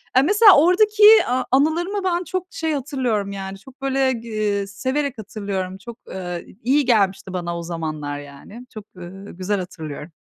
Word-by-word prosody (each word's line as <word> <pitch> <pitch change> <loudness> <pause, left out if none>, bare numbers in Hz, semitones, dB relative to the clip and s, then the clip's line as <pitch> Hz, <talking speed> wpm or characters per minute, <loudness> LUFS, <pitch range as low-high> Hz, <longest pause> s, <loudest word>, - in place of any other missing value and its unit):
Eee, 260 - +7
mesela 410 +6 +6
oradaki 415 +7 +4 0.2
a 255 +1 0
anılarımı 340 +9 +1
ben 360 -1 0
çok 370 0 -4
şey 320 -3 -3
hatırlıyorum 250 -7 -2
yani 195 0 -6
çok, 265 +3 -17
böyle, 270 -1 +1
g 230 -1 -8
eee 205 -2 -1
severek 260 +6 -2
hatırlıyorum. 195 -3 -5
Çok, 230 +4 -11
eee, 180 -2 -6 0.2
iyi 275 +3 +2
gelmişti 195 -5 +1
bana 170 -1 -3
o - - -6
zamanlar 155 -4 -5
yani. 145 - -12
Çok, 215 -2 -9
ııı, 190 +3 -10
güzel 195 +2 -1
hatırlıyorum. 160 -3 -8
220 Hz, 165 wpm, -21 LUFS, 185-280 Hz, 0.2 s, Eee